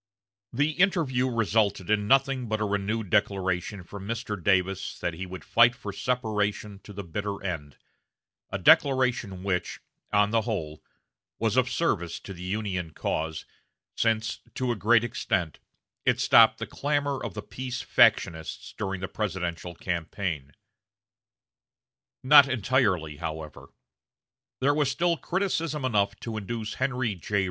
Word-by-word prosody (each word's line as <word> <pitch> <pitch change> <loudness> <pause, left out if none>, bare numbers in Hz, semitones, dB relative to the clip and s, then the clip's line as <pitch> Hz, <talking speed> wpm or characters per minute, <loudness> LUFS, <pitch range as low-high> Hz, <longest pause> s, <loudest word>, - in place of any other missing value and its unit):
The 145 +5 +1
interview 155 -8 +2
resulted 110 -4 +1
in 105 -1 +2
nothing 135 -1 +3
but 110 0 -1
a 105 - 0
renewed 100 0 -2
declaration 95 -2 0
from 100 +2 -9
Mr. 110 -4 -4
Davis 95 0 +1
that 85 - -2
he 95 +3 -6
would 95 0 -8
fight 120 +1 +5
for 100 -4 -7
separation 105 -3 -2
to 105 - -13
the 100 0 -6
bitter 100 +4 -4
end 75 -7 -5 0.7
a - - -2
declaration 125 - +3
which, 90 -3 -2 0.3
on 105 0 +3
the 115 0 +3
whole, 85 -10 -4 0.6
was - - 0
of - - +3
service 85 -1 -1
to 100 - -8
the 85 - -11
Union 95 -2 -3
cause, 80 0 -3 0.5
since, 110 -2 0 0.2
to 130 -1 0
a - - 0
great 115 +2 +4
extent, 90 -8 -2 0.4
it - - +2
stopped - - +6
the - - -4
clamor 145 -1 -1
of - - -5
the 105 - -5
peace 130 -1 -5
factionists 80 -1 +2
during 95 -3 -3
the 95 - -2
presidential 90 -4 -4
campaign. 85 -4 -3 1.7
Not 140 +1 +8
entirely, 100 - +1
however. 80 -2 -7 0.9
There 140 +2 +4
was 145 -2 +1
still 170 +5 +1
criticism 165 -6 -1
enough 100 -4 +1
to 115 -2 -5
induce 110 +1 -4
Henry 130 -4 -1
J. 100 +3 -2
105 Hz, 140 wpm, -27 LUFS, 95-125 Hz, 1.7 s, Not